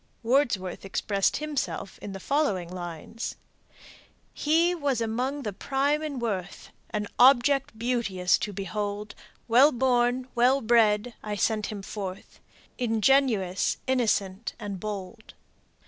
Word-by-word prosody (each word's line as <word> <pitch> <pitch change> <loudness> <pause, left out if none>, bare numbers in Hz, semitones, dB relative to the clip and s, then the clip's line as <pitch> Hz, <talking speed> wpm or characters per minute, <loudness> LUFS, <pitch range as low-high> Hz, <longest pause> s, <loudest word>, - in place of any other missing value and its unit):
Wordsworth 230 -7 +1
expressed 195 0 0
himself 295 -9 -4
in 205 - -7
the 195 - -7
following 210 - 0
lines: 175 +5 -6 1.0
"He 330 +4 +2
was 285 -7 -1
among 250 +5 -2
the 210 -3 -3
prime 280 +8 0
in 300 -3 -4
worth, 200 -6 -4 0.2
An 210 -1 -2
object 265 -1 +5
beauteous 225 -7 +1
to 210 - -3
behold; 205 +1 -4 0.3
Well 255 +6 +6
born, 250 0 +1
well 250 +3 +4
bred; 225 0 +3
I 210 -1 -4
sent 215 +1 0
him 205 -2 -6
forth 195 -2 -7 0.4
Ingenuous, 225 -5 +2
innocent, 220 -5 0
and 205 -3 -5
bold." 210 +2 -7
225 Hz, 115 wpm, -27 LUFS, 200-260 Hz, 1.0 s, Well